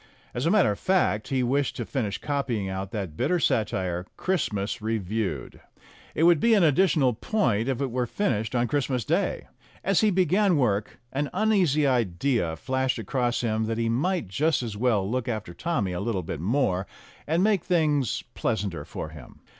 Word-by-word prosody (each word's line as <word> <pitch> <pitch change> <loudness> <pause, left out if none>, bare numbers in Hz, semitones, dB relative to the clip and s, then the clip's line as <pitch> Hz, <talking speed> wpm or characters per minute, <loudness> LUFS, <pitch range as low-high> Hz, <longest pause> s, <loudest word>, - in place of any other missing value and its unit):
As 125 +6 -1
a - - +4
matter 195 - +4
of 100 - -5
fact, 180 - +1
he 130 -2 0
wished 135 +3 0
to 120 - -4
finish 110 -7 -2
copying 130 -8 -2
out 95 0 -4
that 95 -7 -5
bitter 180 - +1
satire, 95 - 0
"Christmas 115 - -1
Reviewed." 105 - -3 0.5
It 160 - +1
would 170 -2 +6
be 230 +6 +4
an 200 - +4
additional 150 -4 +3
point 120 - 0
if 130 -2 -1
it 135 -3 -1
were 125 0 -1
finished 115 - -1
on 120 0 +2
Christmas 130 -5 -1
Day. - - 0 0.4
As 195 -1 +2
he 215 - +4
began 185 0 +3
work, 105 -6 0
an 140 +1 -1
uneasy 185 -9 +2
idea 115 -6 +1
flashed 130 +8 -1
across 120 +2 -1
him 110 -2 0
that 115 0 -2
he 115 0 0
might 160 - 0
just 145 - +1
as 110 -3 -4
well 105 -4 +1
look 125 +2 -2
after 110 -7 -4
Tommy 120 - -1
a 90 - -3
little 100 -3 -2
bit 80 - -5
more, 95 - 0 0.4
and 165 +4 +2
make 205 -4 +2
things 150 - +1
pleasanter 100 -9 -2
for 75 - -6
him. 75 -5 -13
120 Hz, 180 wpm, -26 LUFS, 105-150 Hz, 0.5 s, would